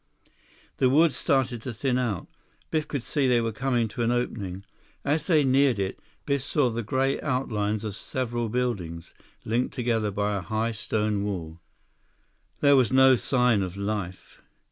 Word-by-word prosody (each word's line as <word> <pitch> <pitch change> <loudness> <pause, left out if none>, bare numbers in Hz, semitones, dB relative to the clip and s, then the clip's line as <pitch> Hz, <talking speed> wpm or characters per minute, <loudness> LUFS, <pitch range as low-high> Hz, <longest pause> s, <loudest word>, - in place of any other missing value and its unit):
The 130 - +3
woods 155 +3 +4
started 130 -4 0
to 130 - -5
thin 125 +1 0
out. 110 -8 -2 0.5
Biff 155 -1 0
could 140 -5 -3
see 140 0 0
they 125 -1 +4
were 115 -1 -1
coming 120 0 0
to 120 - -5
an 115 - +2
opening. 100 -6 -3 0.4
As 150 +1 0
they 155 -5 +4
neared 135 -2 +3
it, 95 -1 -3 0.3
Biff 140 -1 0
saw 135 -1 +1
the 115 +1 -2
gray 130 +5 0
outlines 110 -6 -1
of 105 -3 -4
several 120 -1 -3
buildings, 100 -9 -3 0.3
linked 120 +5 -1
together 115 -4 0
by 105 +1 -1
a 100 - -2
high 110 +5 -1
stone 105 -2 -1
wall. 85 -5 -4 1.0
There 140 -1 +6
was 130 -4 +3
no 130 0 +6
sign 125 -3 +2
of 95 0 -4
life. 100 -3 -5
120 Hz, 165 wpm, -26 LUFS, 105-130 Hz, 1.0 s, There